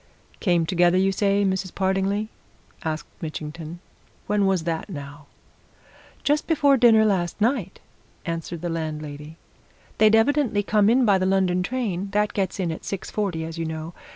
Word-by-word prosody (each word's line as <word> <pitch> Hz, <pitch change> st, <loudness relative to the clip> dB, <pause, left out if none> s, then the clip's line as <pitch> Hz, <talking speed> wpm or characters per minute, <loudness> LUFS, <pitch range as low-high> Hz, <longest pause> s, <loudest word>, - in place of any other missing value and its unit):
"Came 175 Hz, -4 st, +2 dB
together, 175 Hz, +1 st, +3 dB
you 190 Hz, +1 st, +3 dB
say, 200 Hz, +1 st, +1 dB
Mrs. 190 Hz, -1 st, -1 dB
Partingley?" 195 Hz, +2 st, 0 dB, 0.5 s
asked 155 Hz, -1 st, -3 dB, 0.2 s
Mitchington. 160 Hz, +1 st, -6 dB, 0.4 s
"When 205 Hz, -1 st, +1 dB
was 190 Hz, -4 st, +1 dB
that, 165 Hz, +3 st, -3 dB
now?" 145 Hz, -3 st, -9 dB, 1.0 s
"Just 295 Hz, +1 st, +1 dB
before 285 Hz, -4 st, +4 dB
dinner, 230 Hz, -3 st, +5 dB
last 185 Hz, -4 st, 0 dB
night," 220 Hz, -4 st, 0 dB, 0.5 s
answered 165 Hz, -1 st, -4 dB
the 175 Hz, -, -3 dB
landlady. 155 Hz, -1 st, -5 dB, 0.6 s
"They'd 215 Hz, 0 st, +6 dB
evidently 230 Hz, -3 st, +2 dB
come 210 Hz, 0 st, +3 dB
in 250 Hz, +2 st, +4 dB
by 200 Hz, -3 st, +4 dB
the 185 Hz, -, +1 dB
London 190 Hz, -2 st, +2 dB
train 200 Hz, -4 st, -2 dB
that 210 Hz, 0 st, +1 dB
gets 195 Hz, -1 st, -2 dB
in 175 Hz, -3 st, 0 dB
at 160 Hz, -, -7 dB
six 195 Hz, -, -5 dB
forty, 190 Hz, -6 st, -2 dB
as 165 Hz, 0 st, -7 dB
you 165 Hz, -, -1 dB
know. 160 Hz, +1 st, -5 dB
190 Hz, 155 wpm, -24 LUFS, 165-210 Hz, 1.0 s, They'd